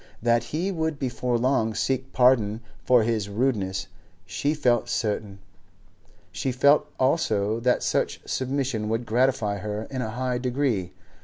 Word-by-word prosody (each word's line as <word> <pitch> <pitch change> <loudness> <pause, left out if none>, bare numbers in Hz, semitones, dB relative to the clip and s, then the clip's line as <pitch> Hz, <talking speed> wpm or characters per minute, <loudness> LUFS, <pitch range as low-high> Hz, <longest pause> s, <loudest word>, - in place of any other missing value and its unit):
That 120 0 +2
he 175 +6 -2
would 160 -4 -2
before 125 -2 -1
long 115 -3 +1
seek 130 +3 -1
pardon 120 -4 +3 0.2
for 125 -3 +4
his 110 -3 -1
rudeness 100 -4 -1 0.4
she 145 +10 -1
felt 125 -6 +1
certain, 105 -2 -2 0.9
she 95 +8 -2
felt 140 +4 +4
also 115 -6 +1
that 125 +1 +1
such - - 0
submission 130 -5 -2
would 115 +2 -1
gratify 115 -3 +1
her 105 +1 -4
in 130 -2 -3
a 110 - -3
high 125 +2 -2
degree. 125 -7 -1
120 Hz, 140 wpm, -25 LUFS, 110-130 Hz, 0.9 s, for